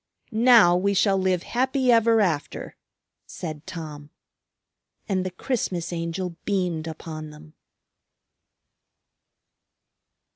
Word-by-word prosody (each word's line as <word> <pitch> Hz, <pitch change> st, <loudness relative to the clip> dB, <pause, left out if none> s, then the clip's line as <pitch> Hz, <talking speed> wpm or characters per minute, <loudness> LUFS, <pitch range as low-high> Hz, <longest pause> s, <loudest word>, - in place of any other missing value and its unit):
"Now 225 Hz, -6 st, +6 dB
we 200 Hz, +2 st, +1 dB
shall 195 Hz, +1 st, +3 dB
live 185 Hz, -2 st, +1 dB
happy 260 Hz, +1 st, +1 dB
ever 230 Hz, -1 st, +4 dB
after," 165 Hz, -7 st, -2 dB, 0.5 s
said 155 Hz, -2 st, -7 dB
Tom. 155 Hz, -5 st, -8 dB, 1.0 s
And 190 Hz, -2 st, 0 dB
the 185 Hz, -, -2 dB
Christmas 180 Hz, -4 st, -3 dB
Angel 170 Hz, +1 st, -4 dB
beamed 180 Hz, -5 st, -1 dB
upon 155 Hz, -1 st, -7 dB
them. 150 Hz, +1 st, -14 dB
180 Hz, 95 wpm, -24 LUFS, 160-210 Hz, 1.0 s, Now